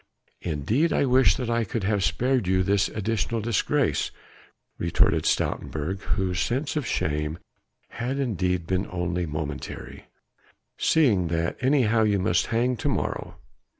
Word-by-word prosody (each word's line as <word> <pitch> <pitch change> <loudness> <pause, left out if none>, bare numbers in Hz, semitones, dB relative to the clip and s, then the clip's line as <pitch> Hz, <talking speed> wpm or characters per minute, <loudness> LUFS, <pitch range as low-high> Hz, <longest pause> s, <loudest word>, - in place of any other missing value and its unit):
"Indeed 95 - 0
I - - +2
wish 130 0 +4
that 125 -4 -3
I 115 0 +1
could 110 +1 -3
have 100 0 +1
spared 120 +6 +1
you 95 0 +2
this 100 +1 +2
additional 110 +2 -1
disgrace," 110 -1 +1 0.7
retorted 85 0 +2
Stoutenburg, 80 +6 -1 0.2
whose 90 -2 -1
sense 130 +10 -1
of 150 -5 -1
shame 75 +1 -1 0.5
had 125 +4 -3
indeed 90 -9 0
been 95 +2 -1
only 90 -1 -2
momentary, 75 -2 -6 0.7
"seeing 110 - +3
that 85 0 -1
anyhow 125 -4 +3
you 105 -2 +3
must 90 -2 +1
hang 120 +2 +1
to - - -1
morrow. - - -3
100 Hz, 135 wpm, -25 LUFS, 90-120 Hz, 0.7 s, wish